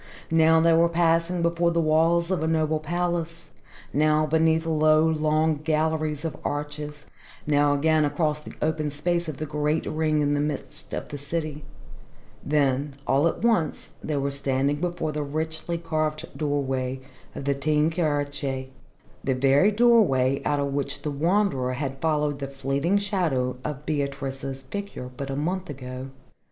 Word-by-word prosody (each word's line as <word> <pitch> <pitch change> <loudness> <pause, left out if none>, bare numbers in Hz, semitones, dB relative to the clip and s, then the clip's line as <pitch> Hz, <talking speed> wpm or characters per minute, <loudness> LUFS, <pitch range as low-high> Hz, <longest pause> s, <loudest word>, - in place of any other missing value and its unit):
Now 160 0 +5
they 165 0 +4
were 165 +1 +4
passing 170 +1 +2
before 170 0 +2
the 170 0 +1
walls 165 +2 +3
of 185 - 0
a 160 - 0
noble 155 -1 +1
palace, 170 0 -3 0.4
now 155 +1 +3
beneath 160 +1 +2
long, 155 0 +3
low 155 +1 +3
galleries 155 -1 0
of 160 - -3
arches, 150 0 -4 0.4
now 145 -1 +3
again 155 +2 +3
across 150 +1 0
the 150 - -11
open 155 -1 0
space 170 +3 -1
of 145 - -6
the 155 - -3
Great 150 +1 -1
Ring 155 -1 +1
in 145 0 +1
the 145 - +1
midst 145 -1 -4
of - - -5
the 145 - -6
city 150 0 -4 0.8
then 140 -1 +1
all 140 +4 +3
at 170 - -3
once 220 -10 +1
they 150 -2 -1
were 140 0 -1
standing 140 +1 0
before 175 -1 -2
the 150 0 -3
richly 160 +3 -3
carved 155 -2 -2
doorway 135 -3 -1 0.4
of 140 - -6
the 140 - +2
Teyn 150 +3 +1
Kirche, 145 -5 -1 0.5
the 130 - +1
very 135 +8 +4
doorway 205 - +4
out 145 -1 +1
of 140 -1 -1
which 140 -1 -2
the 150 - -2
Wanderer 150 -4 +1
had 135 0 -4
followed 150 -3 0
the 140 - -3
fleeting 140 +7 0
shadow 170 -12 0
of 150 -1 -5
Beatrice's 140 -2 -3
figure 200 -5 -6
but 140 +2 -5
a 135 - -2
month 180 +6 -2
ago. 130 -1 -7
150 Hz, 160 wpm, -25 LUFS, 140-165 Hz, 0.8 s, Now